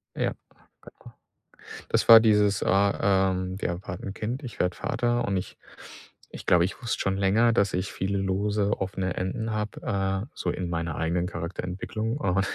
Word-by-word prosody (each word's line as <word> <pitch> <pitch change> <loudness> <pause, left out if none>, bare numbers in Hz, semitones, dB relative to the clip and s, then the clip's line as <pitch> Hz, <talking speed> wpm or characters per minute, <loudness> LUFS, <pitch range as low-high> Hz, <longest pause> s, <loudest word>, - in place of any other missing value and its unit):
Ja. - - 0 0.5
Genau. - - -17 0.8
Das - - +1
war 115 -1 +11
dieses, 105 -3 +3
äh, - - -1
ähm 95 -1 +1
wir - - -1
erwarten 90 +1 -6
'n 95 - -6
Kind, 120 +6 -4
ich 120 -5 -8
werde 90 0 +1
Vater 120 0 0
und 100 -1 0
ich 90 - -5 0.7
ich - - -10
glaube, 85 -1 +4
ich 95 - -5
wusste 115 - -2
schon 95 0 0
länger, 105 +5 +3
dass 100 -4 +2
ich 90 +2 -2
viele 100 +1 -2
lose, 100 +2 0
offene 95 -1 -2
Enden 110 +5 -3
habe, 105 0 -3
äh, 95 -2 -1
so 90 - -2
in 90 0 -3
meiner 85 -1 -3
eigenen 85 +2 0
Charakterentwicklung, 95 - -4
und, 95 -6 +1
95 Hz, 170 wpm, -26 LUFS, 90-105 Hz, 0.8 s, war